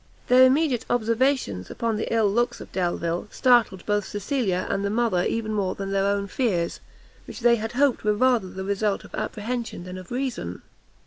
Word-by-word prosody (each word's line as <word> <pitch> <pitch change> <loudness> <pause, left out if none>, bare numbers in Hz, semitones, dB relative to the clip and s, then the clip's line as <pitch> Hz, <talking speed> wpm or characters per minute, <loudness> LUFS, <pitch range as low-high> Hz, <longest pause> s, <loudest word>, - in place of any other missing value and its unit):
Their 255 +1 +8
immediate 270 -2 +2
observations 235 - 0
upon 230 -1 -2
the 215 - -3
ill 225 -2 +3
looks 235 +4 0
of - - -11
Delvile, 175 -1 -1
startled 240 -8 +3
both 205 -2 0
Cecilia 205 -3 -1
and 195 - -1
the 200 - 0
mother 215 -5 +1
even 220 -1 -1
more 195 -3 -1
than 195 0 -5
their 195 0 +1
own 200 0 0
fears, 190 -5 -1 0.5
which - - -8
they 235 0 +5
had 225 +1 -4
hoped 275 0 +2
were 210 -1 +2
rather 240 -4 +2
the 190 +1 -6
result 200 +1 -1
of - - -15
apprehension 230 -2 -4
than 185 +1 -7
of 185 - -12
reason. 245 - -4
215 Hz, 185 wpm, -25 LUFS, 190-240 Hz, 0.5 s, Their